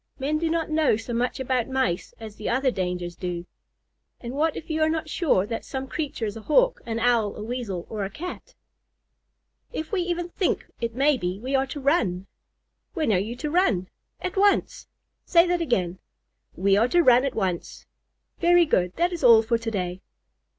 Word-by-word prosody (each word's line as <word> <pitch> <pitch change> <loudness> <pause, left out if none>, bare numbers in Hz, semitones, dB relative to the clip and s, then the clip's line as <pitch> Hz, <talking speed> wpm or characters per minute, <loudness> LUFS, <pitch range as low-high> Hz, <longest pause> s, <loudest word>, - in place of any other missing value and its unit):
Men 290 +3 -1
do 330 0 0
not 325 -1 -1
know 310 -8 +3
so 230 +2 -6
much 245 +3 -1
about 255 -2 0
Mice 260 -9 -1
as 220 -2 -9
the 215 - -4
other 260 +2 +2
dangers 180 -3 -3
do." 175 -1 -4 0.7
"And 240 0 -6
what 305 +3 0
if - - -8
you 315 -1 -1
are 315 - +4
not 320 0 -2
sure 300 - +2
that 225 +1 -4
some 265 -1 -5
creature 275 -5 -3
is 205 - -4
a 225 - -7
Hawk, - - +3
an 225 -1 -2
Owl, 230 -3 +2
a 210 - -6
Weasel, 220 -7 -4
or 215 -2 -4
a 195 - -3
Cat?" 340 - -8 1.2
"If 315 -10 -5
we 395 -4 +1
even 350 0 -2
think 365 +1 -1
it 230 -1 -3
may 280 +2 +3
be, 180 +1 -2
we 260 +5 -4
are 270 0 +2
to 285 - -6
run." 230 - +1 0.7
"When 310 - +1
are 180 - +3
you 220 +5 -3
to 295 +4 -4
run?" 225 - +2 0.3
"At 365 +1 -4
once." 400 0 +2 0.4
"Say 335 -1 +5
that 350 -1 0
again." 185 - 0 0.6
"We 195 +2 +3
are 225 +3 +4
to 345 +6 +3
run 250 -2 +6
at 275 -2 -2
once." 185 -5 -3 0.5
"Very 350 0 +5
good. 180 - +1
That 350 +1 +1
is 335 - -5
all 230 -3 +8
for 230 +1 +1
to 230 0 -3
day." 185 -3 -3
250 Hz, 200 wpm, -25 LUFS, 210-315 Hz, 1.2 s, all